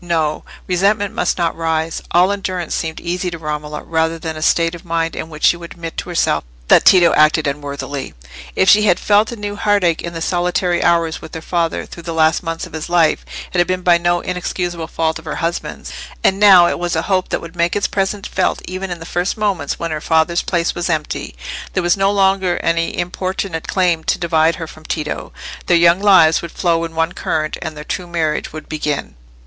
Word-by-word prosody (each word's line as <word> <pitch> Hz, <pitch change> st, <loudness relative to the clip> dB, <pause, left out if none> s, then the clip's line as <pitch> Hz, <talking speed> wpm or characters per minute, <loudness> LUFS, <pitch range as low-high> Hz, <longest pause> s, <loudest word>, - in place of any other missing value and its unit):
No! 160 Hz, -3 st, -1 dB, 0.2 s
resentment 200 Hz, +3 st, +1 dB
must -, -, 0 dB
not 170 Hz, -2 st, 0 dB
rise: 160 Hz, 0 st, -1 dB
all 180 Hz, +3 st, +4 dB
endurance 185 Hz, -4 st, -3 dB
seemed 160 Hz, -1 st, -3 dB
easy 180 Hz, +1 st, -2 dB
to 170 Hz, -, -6 dB
Romola 150 Hz, -1 st, -5 dB
rather 160 Hz, 0 st, 0 dB
than 160 Hz, 0 st, -5 dB
a 155 Hz, -, -7 dB
state 165 Hz, +1 st, +2 dB
of 175 Hz, -, -9 dB
mind 165 Hz, -1 st, -1 dB
in 160 Hz, -, -5 dB
which 155 Hz, -1 st, -10 dB
she 170 Hz, -, +5 dB
would 170 Hz, -1 st, -10 dB
admit 165 Hz, -2 st, -7 dB
to -, -, -4 dB
herself 165 Hz, -, +1 dB, 0.3 s
that -, -, +6 dB
Tito 180 Hz, -3 st, +6 dB
acted 155 Hz, +1 st, +4 dB
unworthily. 140 Hz, -1 st, -4 dB, 0.4 s
If 190 Hz, -, +2 dB
she 210 Hz, -, +7 dB
had 180 Hz, -3 st, +3 dB
felt 210 Hz, +2 st, +3 dB
a -, -, -5 dB
new 205 Hz, -2 st, -5 dB
heartache 200 Hz, -5 st, +1 dB
in 170 Hz, -, -6 dB
the 165 Hz, -, -5 dB
solitary 175 Hz, 0 st, 0 dB
hours 170 Hz, -2 st, +2 dB
with -, -, -10 dB
her -, -, -4 dB
father 170 Hz, -2 st, -1 dB
through 170 Hz, -, -10 dB
the 165 Hz, -1 st, -5 dB
last 160 Hz, 0 st, +3 dB
months 165 Hz, -1 st, -4 dB
of -, -, -14 dB
his 160 Hz, +1 st, -5 dB
life, 170 Hz, -3 st, +3 dB, 0.3 s
it 180 Hz, -, +1 dB
had 175 Hz, -, +3 dB
been 185 Hz, 0 st, -2 dB
by 175 Hz, -1 st, +5 dB
no 175 Hz, 0 st, +1 dB
inexcusable 175 Hz, -2 st, -3 dB
fault 160 Hz, -1 st, -1 dB
of -, -, -16 dB
her -, -, -4 dB
husband's; 170 Hz, 0 st, -4 dB, 0.3 s
and 195 Hz, 0 st, +3 dB
now—it 190 Hz, -4 st, +6 dB
was 175 Hz, -1 st, -1 dB
a 160 Hz, -, 0 dB
hope 185 Hz, -2 st, 0 dB
that -, -, -1 dB
would 170 Hz, +1 st, -10 dB
make 170 Hz, 0 st, +1 dB
its 205 Hz, -, 0 dB
presence 195 Hz, 0 st, -1 dB
felt 185 Hz, -, 0 dB
even 185 Hz, +1 st, -5 dB
in 175 Hz, -1 st, -5 dB
the 165 Hz, -, -9 dB
first 175 Hz, +4 st, -2 dB
moments 195 Hz, -9 st, -1 dB
when 165 Hz, -1 st, -4 dB
her 155 Hz, -1 st, -3 dB
father's 160 Hz, +2 st, +2 dB
place 170 Hz, -2 st, 0 dB
was 175 Hz, 0 st, -3 dB
empty—there 155 Hz, -, -4 dB
was 175 Hz, 0 st, +3 dB
no 195 Hz, 0 st, +2 dB
longer 190 Hz, -2 st, +2 dB
any 165 Hz, 0 st, 0 dB
importunate 180 Hz, -1 st, -3 dB
claim 175 Hz, -4 st, +1 dB
to -, -, +1 dB
divide 165 Hz, -1 st, +2 dB
her 165 Hz, -, -5 dB
from 155 Hz, 0 st, -13 dB
Tito; 155 Hz, -1 st, -4 dB, 0.4 s
their 175 Hz, -, +5 dB
young 170 Hz, +1 st, +5 dB
lives 185 Hz, -6 st, +5 dB
would 170 Hz, -, -7 dB
flow 170 Hz, -2 st, 0 dB
in 165 Hz, 0 st, -9 dB
one 165 Hz, +1 st, +1 dB
current, 155 Hz, -3 st, -2 dB
and 160 Hz, -2 st, -5 dB
their 150 Hz, -, -7 dB
true 180 Hz, +3 st, -4 dB
marriage 160 Hz, -3 st, -1 dB
would 155 Hz, 0 st, -9 dB
begin. 150 Hz, -2 st, -3 dB
170 Hz, 215 wpm, -18 LUFS, 160-180 Hz, 0.4 s, she